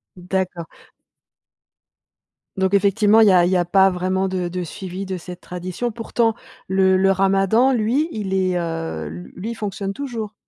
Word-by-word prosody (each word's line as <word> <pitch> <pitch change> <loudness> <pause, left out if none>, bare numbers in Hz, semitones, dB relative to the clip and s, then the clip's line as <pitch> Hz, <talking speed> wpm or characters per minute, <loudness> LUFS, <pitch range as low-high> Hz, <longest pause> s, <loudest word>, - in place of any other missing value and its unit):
D'accord. 180 -1 -3 1.9
Donc 190 0 +1
effectivement 205 +2 +4
il 220 - +6
y - - +6
a 180 -2 +5
il 180 - 0
y - - +2
a 180 - +3
pas 190 +2 +4
vraiment 185 +1 -1
de 185 -2 -2
de 180 +1 -4
suivi 185 +3 -6
de 190 0 -4
cette 180 0 -9
tradition. 180 +7 -5
Pourtant 225 0 0 0.3
le 190 0 +3
le 195 +1 +3
ramadan 195 +6 +3
lui 255 +7 +1
il 205 -6 -4
est, 185 -1 +1
heu, 165 - -4
lu 85 +4 -9
lui, 215 +5 -4
il - - -6
fonctionne 200 -2 -4
toujours? 230 -5 -5
190 Hz, 170 wpm, -21 LUFS, 180-210 Hz, 1.9 s, il